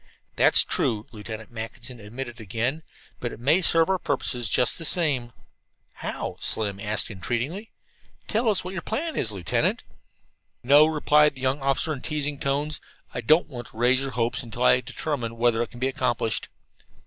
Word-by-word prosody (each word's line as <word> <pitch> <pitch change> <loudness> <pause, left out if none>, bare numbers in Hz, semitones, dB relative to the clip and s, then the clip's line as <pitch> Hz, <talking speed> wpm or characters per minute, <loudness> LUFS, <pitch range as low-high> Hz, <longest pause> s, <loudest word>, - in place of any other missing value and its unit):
"That's - - +7
true," 110 -1 -1
Lieutenant 110 0 -8
Mackinson 120 +2 -6
admitted 120 +3 -7
again, 115 - -2 0.4
"but 120 - -3
it - - -10
may 145 +9 +3
serve 165 -1 +5
our 190 -1 +1
purposes 120 -9 0
just 125 - +1
the - - -5
same." 145 -8 +1 0.6
"How?" - - -5
Slim 100 -3 -1
asked 105 +2 -2
entreatingly. 120 - -3 0.6
"Tell 225 +1 +1
us 205 - +1
what 180 +1 -6
your 180 - -3
plan 315 +8 -3
is, 110 - 0
Lieutenant." 95 -5 0 0.8
"No," 145 +5 +7
replied 150 -1 +3
the 130 - -11
young 130 +2 +1
officer 140 +3 +1
in 135 - -7
teasing 150 -2 -2
tones, 145 +2 -1 0.3
"I 120 - -3
don't 155 +9 +4
want 120 -6 -8
to - - -16
raise 125 +3 +3
your 135 - -2
hopes 120 -1 -1
until 120 0 -5
I 125 0 +5
determine 120 -6 -4
whether 120 -1 +2
it 120 - -2
can 120 - -12
be 130 +1 +1
accomplished." 120 -4 -1
125 Hz, 170 wpm, -25 LUFS, 115-150 Hz, 0.8 s, That's